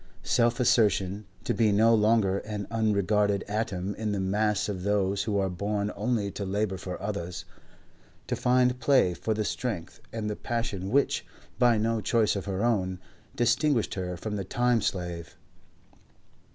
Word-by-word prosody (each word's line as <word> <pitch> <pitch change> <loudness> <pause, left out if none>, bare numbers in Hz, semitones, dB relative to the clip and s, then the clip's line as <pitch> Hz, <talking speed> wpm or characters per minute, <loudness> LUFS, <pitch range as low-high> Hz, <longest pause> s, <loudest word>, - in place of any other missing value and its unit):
Self 120 +2 +2
assertion; 105 -4 +2 0.2
to - - 0
be 110 -3 +3
no 110 +3 +5
longer 105 -3 +3
an 105 -1 -5
unregarded 105 -2 +1
atom 100 -2 -2
in 105 -1 -3
the 100 - -1
mass 105 +1 +1
of 100 -3 -4
those 100 0 0
who 105 -2 0
are 95 -1 +1
born 100 +3 -2
only 110 -5 -1
to 100 - -5
labour 100 0 -1
for 90 -1 -6
others; 95 -4 -4 0.8
to - - -2
find 125 0 +2
play 130 -11 +3
for 110 +5 -2
the 110 0 -1
strength 100 -10 -4
and 110 -2 -3
the 105 - -2
passion 105 -6 -3
which, 140 +5 +2 0.4
by 120 -2 +5
no 110 +1 0
choice 110 -1 +2
of 100 - -4
her 100 +2 -1
own, 95 -6 0 0.4
distinguished 120 +1 +2
her 90 -2 -4
from 105 +4 -4
the 100 - -3
tame 120 +3 +1
slave. 85 -6 -4
105 Hz, 160 wpm, -28 LUFS, 95-115 Hz, 0.8 s, no